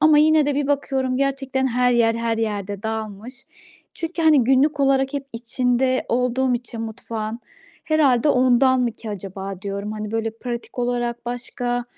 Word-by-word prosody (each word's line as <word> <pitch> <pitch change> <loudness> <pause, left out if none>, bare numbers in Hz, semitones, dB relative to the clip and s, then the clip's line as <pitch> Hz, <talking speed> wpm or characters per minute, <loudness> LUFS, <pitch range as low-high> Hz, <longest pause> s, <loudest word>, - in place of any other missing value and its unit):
ama 310 0 +6
yine 310 -1 +5
de 290 - +1
bir 285 0 0
bakıyorum 270 -2 0
gerçekten 270 -1 0
her 250 0 +2
yer 230 -1 +3
her 230 -1 -1
yerde 205 -3 -3
dağılmış. 220 +2 -5 0.6
Çünkü, 330 0 -4
hani, 305 -6 +5
günlük 275 +4 +3
olarak 270 0 +2
hep 280 -1 -3
içinde 250 +2 0
olduğum 250 +1 +1
için 240 -1 -5
mutfağın 225 0 -5 0.4
herhâlde 295 -4 +3
ondan 255 0 +4
mı 240 -2 0
ki 220 0 -8
acaba 195 -1 -6
diyorum. 200 +1 -4
Hani 215 -1 -5
böyle 225 0 -1
pratik 240 0 -6
olarak 240 -1 -2
başka, 245 0 -3
245 Hz, 155 wpm, -22 LUFS, 225-270 Hz, 0.6 s, ama